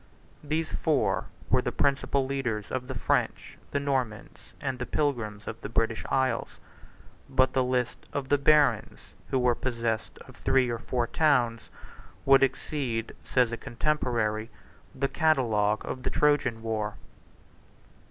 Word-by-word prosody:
These 155 +2 -1
four 155 -4 +1 0.3
were - - +5
the - - -2
principal 140 -1 +1
leaders 125 -6 -2
of 130 -1 -3
the 130 - -5
French, - - -1
the 140 - 0
Normans, 130 -6 -3
and 135 -3 -3
the 125 - -3
pilgrims 115 -8 -1
of 115 - -6
the - - -5
British 115 0 0
isles: 130 -3 0 0.7
but 130 0 +3
the 130 - +3
list 125 -1 -1
of 140 -2 -3
the 145 - +4
barons 140 -5 +4 0.3
who - - +1
were 125 -1 +3
possessed 115 -3 -2
of - - -14
three 130 -2 +2
or 115 - -3
four 120 +1 -1
towns 120 -5 +1 0.6
would 135 0 +7
exceed, 130 -4 -1
says 125 -2 +2
a 115 - -3
contemporary, 115 -5 -1 0.5
the 135 +1 0
catalogue 115 -11 +2
of 130 - -4
the - - -1
Trojan 140 -6 +2
war. 110 -2 -2
125 Hz, 145 wpm, -28 LUFS, 115-140 Hz, 0.7 s, would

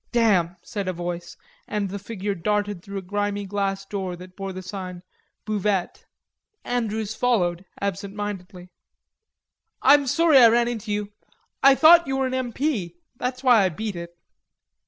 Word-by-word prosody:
"Damn," 195 -8 +2
said 200 -3 -5
a 185 - -1
voice, 175 0 -5 0.3
and 210 -1 -1
the 200 - -4
figure 205 -1 -4
darted 205 +1 -1
through 200 +2 -7
a 195 - -5
grimy 205 +1 -2
glass 195 0 -2
door 190 -3 -4
that 180 +1 -13
bore 195 -1 -5
the 185 0 -7
sign: 185 -2 -7 0.4
"Buvette." 205 -3 -1 0.6
Andrews 220 -3 -2
followed 185 -8 0
absent 200 0 -3
mindedly. 185 -3 -6 1.1
"I'm 280 0 +6
sorry 320 0 +5
I 240 - +9
ran 235 +1 +3
into 225 -3 -4
you.... 205 0 -2 0.5
I 275 0 +7
thought 335 +3 +7
you 270 0 -1
were 265 - +1
an 260 - -2
M.P., 250 - -2 0.2
that's 255 +1 -3
why 245 -4 +6
I 190 - +3
beat 205 +4 -5
it." 170 0 -8
205 Hz, 155 wpm, -24 LUFS, 185-235 Hz, 1.1 s, I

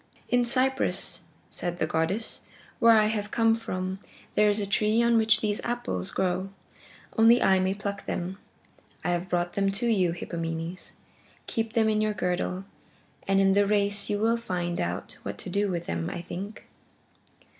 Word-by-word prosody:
"In 245 0 +3
Cyprus," 260 +2 +1 0.3
said 175 -1 -3
the 160 - +1
goddess, 165 +8 -1 0.4
"where 230 -1 +7
I 215 - +5
have 210 -1 -1
come 225 0 +3
from, 185 -4 -3 0.3
there 210 0 +4
is 205 +1 +1
a 205 - -1
tree 215 +3 +2
on 235 0 +4
which 220 -1 +4
these 210 -1 0
golden 240 - -2
apples 90 - -3
grow. 185 +1 -1 0.7
Only 230 +2 +7
I 190 -1 +4
may 190 +1 +1
pluck 200 -1 -5
them. 185 +2 -3 0.6
I - - 0
have 175 +1 -2
brought 175 0 0
them 195 -1 +1
to 215 +5 -1
you, 195 -7 +3
Hippomenes. 165 0 -5 0.5
Keep 225 -1 -2
them 225 -2 +3
in 215 -1 +2
your 215 -1 0
girdle, 180 0 -1 0.6
and 195 0 +3
in 195 0 +4
the 200 0 +3
race 205 0 +1
you 205 - +1
will 225 +2 +2
find 175 -6 -2
out 85 +2 -4
what 100 0 -5
to 180 - -6
do 200 +2 +1
with 175 -2 -3
them, 85 0 -2
I 175 - -5
think." 195 +5 -7
200 Hz, 175 wpm, -27 LUFS, 175-220 Hz, 0.7 s, where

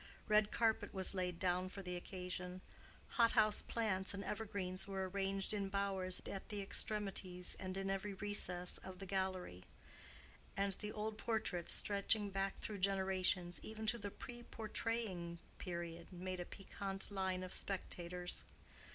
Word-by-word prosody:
Red 210 -1 +6
carpet 225 -3 +2
was 190 0 +5
laid 180 -2 0
down 180 +1 +2
for 195 +1 -6
the 180 -1 -2
occasion: 180 0 -4 0.5
hot 230 -2 +5
house 215 -1 +6
plants 200 -4 0
and 200 - -3
evergreens 200 -4 0
were 190 -1 -1
arranged 195 +1 0
in 200 -2 0
bowers 195 -2 0
at 195 - -5
the 210 -2 -2
extremities 195 -3 -1
and 185 0 -2
in 195 0 -1
every 195 +1 -1
recess 180 -3 0
of 190 -1 -8
the 195 - -6
gallery; 185 - -1 0.9
and 200 0 +2
the 210 - -2
old 215 0 -2
portraits 215 -7 +1
stretching 205 0 +3
back 195 0 0
through 210 -2 -4
generations, 190 -2 +3
even 220 0 -4
to 235 +2 +2
the 205 -1 -3
pre 240 +4 -7
portraying 215 -7 -1 0.2
period, 170 -1 -4
made 185 0 -3
a 175 - -2
piquant 195 +1 -4
line 190 -2 0
of 185 - -3
spectators. 180 -2 -1
195 Hz, 150 wpm, -40 LUFS, 185-205 Hz, 0.9 s, Red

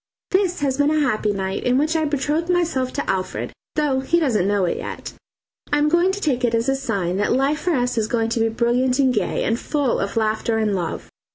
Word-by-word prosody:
This 370 -4 +1
has 270 -1 0
been 285 +1 +4
a 310 0 +2
happy 215 -3 0
night, 190 -1 -3
in 250 +1 +2
which 310 +3 +1
I 315 -1 +1
betrothed 300 +3 -1
myself 320 -8 +1
to 285 - -3
Alfred, 185 -1 -2 0.2
though 290 -4 +1
he 300 +6 +1
doesn't 230 - +1
know 200 -2 +2
it 175 - -1
yet. - - -6 0.6
I 290 - +3
am 295 +1 +3
going 345 +3 +3
to 395 - -4
take 265 -9 0
it 235 -1 +2
as 230 +2 0
a 270 - +2
sign 200 -9 -2
that 205 - +1
life 275 +3 +1
for 350 -3 0
us 245 -2 0
is 215 - 0
going 225 -1 0
to 230 - -1
be 225 0 +2
brilliant 245 +3 +1
and 265 -3 +3
gay, - - -1
and 225 +2 0
full 285 -5 0
of 200 +3 -3
laughter 220 +1 0
and 215 -2 +1
love. 175 -3 -4
255 Hz, 240 wpm, -21 LUFS, 225-295 Hz, 0.6 s, been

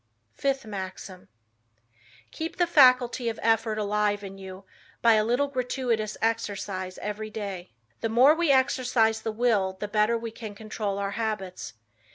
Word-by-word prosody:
Fifth 270 -3 -1
Maxim: 190 -2 -7 1.0
"Keep 320 +1 -5
the 350 - +3
faculty 255 -6 +4
of 225 - -6
effort 225 -1 +2
alive 210 0 0
in 195 0 -9
you 190 0 -9 0.4
by 230 -1 +7
a 215 -1 +3
little 245 +6 +1
gratuitous 250 -5 -2
exercise 200 -4 -2
every 210 +1 -4
day." 200 - -6 0.3
The 225 - -2
more 250 +6 +6
we 330 -2 +2
exercise 250 -4 +2
the 220 - -2
will, 215 -4 +1
the 210 - -3
better 210 +2 +2
we 230 0 -6
can 220 -2 -8
control 210 -1 -4
our 200 0 -2
habits. 205 -4 -4
220 Hz, 150 wpm, -26 LUFS, 205-245 Hz, 1.0 s, by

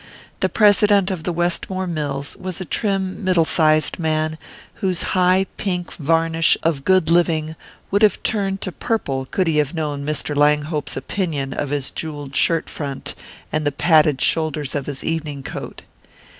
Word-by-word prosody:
The - - +1
President 205 -2 +4
of 170 -4 -5
the 180 - 0
Westmore 175 +2 -1
mills 145 -5 -3
was 185 -2 -5
a 185 - -4
trim 195 0 -2
middle 180 -3 +3
sized 155 +1 +2
man, 155 -1 -1 0.4
whose 185 -3 +1
high 185 +1 +3
pink 180 -4 -3
varnish 165 +1 +2
of 160 -4 0
good 185 -2 +3
living 160 -2 +2 0.4
would 200 +1 +2
have 215 -2 +3
turned 195 -2 -1
to 185 - -3
purple 140 - -2
could 185 - 0
he 160 -2 +1
have 150 +2 +1
known 150 -3 -2
Mr. 150 0 -2
Langhope's 150 0 +1
opinion 140 -1 -2
of 145 - -3
his 145 -1 -2
jewelled 145 -3 -6
shirt 165 +2 +2
front 140 -3 -5 0.4
and 155 - 0
the 145 - +1
padded 150 -2 +3
shoulders 155 -4 +1
of 140 -2 -3
his 140 -2 -4
evening 150 -4 -3
coat. - - -7
160 Hz, 160 wpm, -21 LUFS, 150-185 Hz, 0.4 s, President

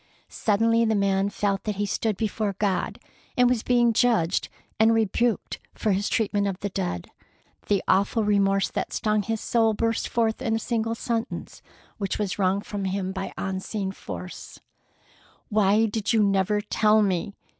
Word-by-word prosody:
Suddenly 230 +2 +2
the 220 -1 +2
man 195 0 +1
felt 200 -1 -1
that 210 -1 -1
he 205 +1 -1
stood 210 0 -1
before 215 -2 -1
God 200 -3 -1 0.4
and 250 0 +5
was 245 -2 +1
being 240 -1 +3
judged 215 -7 +2 0.3
and 225 +1 +5
rebuked 225 0 0 0.2
for 215 - 0
his 200 +2 0
treatment 205 -2 +1
of 195 -1 -3
the 200 - -2
dead. 180 - -4 0.6
The 200 -2 +1
awful 200 +3 +2
remorse 195 -1 +2
that - - -3
stung 215 -1 +1
his 225 +2 -2
soul 225 -2 +2
burst 230 +1 0
forth 225 -2 0
in 225 - 0
a - - 0
single 225 -1 -1
sentence 230 +1 -4 0.4
which 195 -2 -2
was 205 -2 -2
wrung 190 +1 +2
from 205 -1 -5
him 190 0 -2
by 190 0 -4
an - - -8
unseen 190 +1 -3
force: 180 -1 -8 0.9
"Why 210 0 +3
did 215 0 -1
you 220 -2 +4
never 200 +1 +2
tell 215 +1 +3
me?" 200 +1 -1
210 Hz, 165 wpm, -25 LUFS, 195-225 Hz, 0.9 s, and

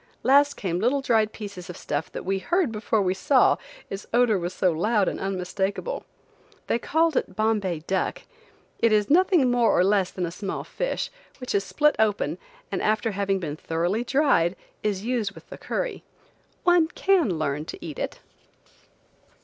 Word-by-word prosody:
Last 285 +2 +5
came 180 -3 -2
little 255 +7 +2
dried 220 -4 +2
pieces 200 -5 -8
of 180 - -7
stuff 145 +2 -3
that - - -6
we 195 +1 0
heard 345 - +1
before 215 -1 0
we 185 -1 +1
saw, 255 +7 +4 0.3
its 195 - -7
odor 235 -4 +3
was 175 +1 -3
so 185 -1 +1
loud 205 +5 +1
and - - -2
unmistakable. 195 - -2 0.6
They 235 - 0
called 320 +4 +1
it 185 - -1
Bombay 205 -6 0
duck. 190 0 -1 0.6
It 230 - +3
is 210 +3 +2
nothing 345 -6 +4
more 240 -2 +3
or 180 - +5
less 195 -1 +2
than 180 - -3
a 170 - -4
small 195 +2 -4
fish, - - -3 0.3
which 250 -2 -5
is 200 - +2
split 300 +9 +2
open, 215 -2 +1 0.3
and - - -1
after 215 +1 +1 0.2
being 185 -7 -1
thoroughly 170 +8 -1
dried, 245 - +2 0.3
is 205 -1 -2
used 230 -5 -1
with - - -14
the - - -7
curry. - - -3 0.6
One 350 -2 +5
can 340 - +2
learn 150 -1 -2
to - - -8
eat 155 -4 -6
it. - - -4
210 Hz, 170 wpm, -25 LUFS, 185-250 Hz, 0.6 s, Last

